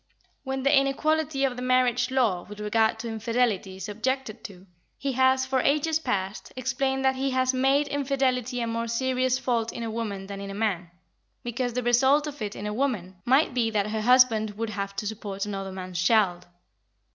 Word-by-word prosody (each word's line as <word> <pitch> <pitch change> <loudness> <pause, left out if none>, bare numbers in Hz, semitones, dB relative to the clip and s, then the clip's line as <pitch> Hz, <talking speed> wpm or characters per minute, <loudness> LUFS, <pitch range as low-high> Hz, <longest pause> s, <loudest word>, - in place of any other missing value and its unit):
When 265 -1 -3
the 280 +2 +4
inequality 280 +1 +1
of 260 -2 -1
the 250 - -6
marriage 250 0 +2
law 230 -9 +1
with 210 0 -9
regard 220 +1 +1
to 235 - -6
infidelity 225 -4 -1
is 190 +1 -7
objected 235 +2 -3
to, 190 -2 -10 0.3
he 275 - -2
has, 260 +1 +3
for 260 0 0
ages 305 +4 +2
past, 195 -8 -3
explained 265 +1 -1
that 265 0 +2
he 270 +1 0
has 255 0 +1
made 270 +3 +2
infidelity 265 -3 0
a - - 0
more 230 0 -2
serious 255 +2 +1
fault 235 -3 -1
in 235 - -6
a 225 - -3
woman 210 -4 -4
than 200 0 -7
in 200 - -6
a 195 - -6
man, 195 -5 -1 0.5
because 240 0 -2
the 250 +1 -2
result 265 +5 +4
of 290 -4 -7
it 205 -1 -3
in 205 - -6
a 210 - -2
woman 210 -8 -2
might 265 +3 +3
be 240 -2 +1
that 210 -1 -1
her 220 0 -1
husband 225 -3 +4
would 225 -1 -3
have 200 -1 -4
to 210 - -4
support 205 -2 -4
another 195 -2 -4
man's 185 -1 -5
child. 185 -3 +2
240 Hz, 195 wpm, -26 LUFS, 210-265 Hz, 0.5 s, the